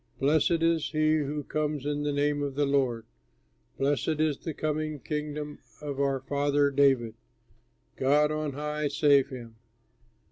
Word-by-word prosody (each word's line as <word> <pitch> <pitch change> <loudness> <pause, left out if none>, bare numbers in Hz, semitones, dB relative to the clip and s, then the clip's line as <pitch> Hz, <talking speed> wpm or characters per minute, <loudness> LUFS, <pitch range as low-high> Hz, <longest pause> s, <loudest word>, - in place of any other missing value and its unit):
Blessed 160 +4 +2
is 165 -2 +2
he 155 0 +2
who 150 0 -2
comes 150 -1 -2
in 145 0 -1
the 145 0 -1
name 145 0 0
of 140 -2 -3
the 145 0 +2
Lord! 130 -5 0 0.7
Blessed 145 +3 0
is 155 -3 +1
the 165 - -5
coming 155 0 -2
Kingdom 150 0 -4 0.2
of 145 -2 -5
our 140 -1 +1
father 145 +1 +1
David! 135 -5 +3 0.8
God 150 +3 +3
on 155 -2 -2
high, 150 +1 -2
save 140 -1 +3
him!" 120 -4 -9
145 Hz, 145 wpm, -28 LUFS, 140-150 Hz, 0.8 s, David